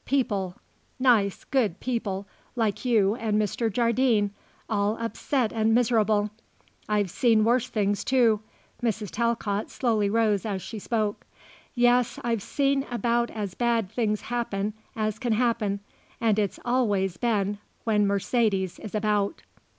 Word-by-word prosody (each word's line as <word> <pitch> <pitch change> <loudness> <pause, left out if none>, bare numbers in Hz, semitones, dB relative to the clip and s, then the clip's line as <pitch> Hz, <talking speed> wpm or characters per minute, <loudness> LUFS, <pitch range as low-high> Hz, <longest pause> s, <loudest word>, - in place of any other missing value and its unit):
People, 205 -9 0 0.4
nice, 230 -7 +3
good 220 -9 0
people, 205 -6 -2 0.3
like 220 -4 0
you 215 -5 +3
and 215 -2 0
Mr. 220 +2 0
Jardine, 235 -2 +2 0.4
all 210 0 0
upset 230 +1 -1
and 225 0 +2
miserable. 220 -3 +2 0.6
I've 205 -4 +1
seen 225 -1 +3
worse 240 +2 +2
things, 205 -2 0
too," 235 -5 +3 0.4
Mrs. 220 -4 -1
Talcott 225 -3 -1
slowly 220 -5 +1
rose 215 -2 +2
as 200 -4 -3
she 220 - -6
spoke. 215 -1 -2 0.5
"Yes, 245 0 +3
I've 230 -3 0
seen 275 +4 +1
about 240 0 +1
as 205 -4 -4
bad 230 -4 0
things 215 -3 0
happen 215 -4 -2 0.2
as 215 -1 -2
can 240 -3 0
happen, 220 -4 0 0.4
and 220 -2 +2
it's 205 -3 -1
always 205 -7 +1
been 205 -3 0 0.2
when 210 -2 +2
Mercedes 200 -2 0
is 215 -1 -7
about." 210 -1 0
220 Hz, 135 wpm, -26 LUFS, 205-235 Hz, 0.6 s, nice